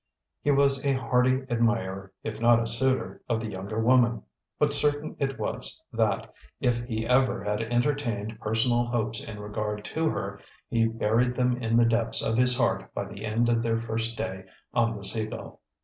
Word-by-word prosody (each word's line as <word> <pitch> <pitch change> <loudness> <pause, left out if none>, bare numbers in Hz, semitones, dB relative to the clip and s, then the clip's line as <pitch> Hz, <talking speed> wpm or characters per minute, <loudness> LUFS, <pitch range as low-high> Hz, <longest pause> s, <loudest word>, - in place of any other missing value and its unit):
He - - 0
was 140 -1 +3
a 140 -1 +2
hearty 130 +1 +2
admirer, 115 -6 0
if 110 0 -5
not 120 0 +6
a 115 - -1
suitor, 130 +3 -1
of 115 -2 +1
the 110 -1 -5
younger 100 +3 -4
woman; 120 -1 +3 0.3
but 150 -1 +2
certain 145 +1 0
it 135 -3 -1
was, - - -4
that, - - 0 0.3
if 120 -1 +1
he 110 -2 -3
ever 125 -3 +2
had 105 +1 -1
entertained 120 -3 -1
personal 120 +2 +1
hopes 115 -2 -1
in 105 -2 -8
regard 105 0 -4
to 160 0 0
her, - - -4 0.3
he 115 -1 +3
buried 115 +2 +1
them 125 0 +1
in 115 0 +2
the 120 - +5
depths 115 0 +1
of 115 - 0
his 125 +1 +6
heart - - 0
by - - -2
the - - -9
end 110 +2 +1
of 115 -1 +2
their 115 -1 0
first 115 0 -2
day 95 0 -4 0.3
on 115 -2 +1
the 100 - -9
Sea 110 +2 +1
Gull. - - -9
115 Hz, 185 wpm, -27 LUFS, 110-125 Hz, 0.3 s, not